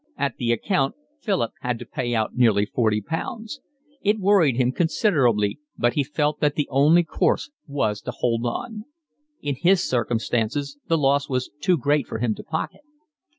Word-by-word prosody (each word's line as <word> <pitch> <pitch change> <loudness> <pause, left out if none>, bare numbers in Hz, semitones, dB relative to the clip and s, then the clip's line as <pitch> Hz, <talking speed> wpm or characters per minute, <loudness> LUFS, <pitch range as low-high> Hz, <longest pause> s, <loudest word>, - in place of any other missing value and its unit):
At 140 -4 -1
the 120 -1 0
account 135 - 0 0.2
Philip 195 - 0
had 125 -1 -2
to - - -9
pay 120 -4 -2
out 110 -1 -1
nearly 110 -5 +4
forty 110 -1 +1
pounds. 220 - -5 0.4
It 210 +2 +2
worried 190 - +4
him 125 -1 +2
considerably, 135 - +2 0.2
but 120 0 +2
he 145 - +1
felt 150 +1 -1
that 145 -1 +1
the 150 - 0
only 150 +6 +5
course 170 - 0 0.2
was 105 -7 -1
to - - -5
hold 115 -1 0
on: 215 - -4 0.6
in 145 - 0
his 175 +7 +3
circumstances 120 +4 -1
the 165 - +3
loss 140 0 +2
was 130 -1 -2
too 180 +2 +2
great 145 0 +1
for - - -4
him 115 -1 0
to - - -9
pocket. 160 - -4
140 Hz, 170 wpm, -24 LUFS, 120-165 Hz, 0.6 s, only